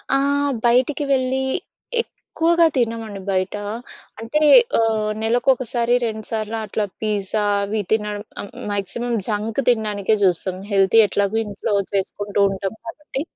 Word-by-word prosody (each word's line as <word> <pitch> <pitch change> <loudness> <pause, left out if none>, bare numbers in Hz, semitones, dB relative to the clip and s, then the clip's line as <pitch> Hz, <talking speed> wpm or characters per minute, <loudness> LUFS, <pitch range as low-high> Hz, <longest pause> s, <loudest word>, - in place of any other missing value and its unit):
ఆహ్, 285 +1 +1
బయటికి 255 +5 +3
వెళ్లి 260 0 0 0.6
ఎక్కువగా 335 -6 +1
తినమండి 225 -4 -2
బయట. 185 +1 0 0.6
అంటే 230 +7 -1 0.4
ఆహ్, 220 -1 +1
నెలకొకసారి, 240 0 +1
రెండు 220 -1 -5
సార్లు 220 0 -2
అట్లా 210 0 -1 0.2
పిజ్జా 210 -1 -1 0.2
అవి 210 +1 -1
తినడం 210 -1 0 0.2
ఆహ్, 200 - -9 0.2
మాక్సిమం 220 +4 -3
జంక్ 215 +2 -2
తినడానికే 215 -3 +1
జూస్తాం. 185 0 +1
హెల్తీ 195 +3 +4
ఎట్లాగో 200 +2 0
ఇంట్లో 205 +1 -3 0.2
చేసుకుంటూ 200 +1 -2
ఉంటాం 195 0 -3
కాబట్టి. 270 +3 -6
220 Hz, 115 wpm, -21 LUFS, 205-245 Hz, 0.6 s, హెల్తీ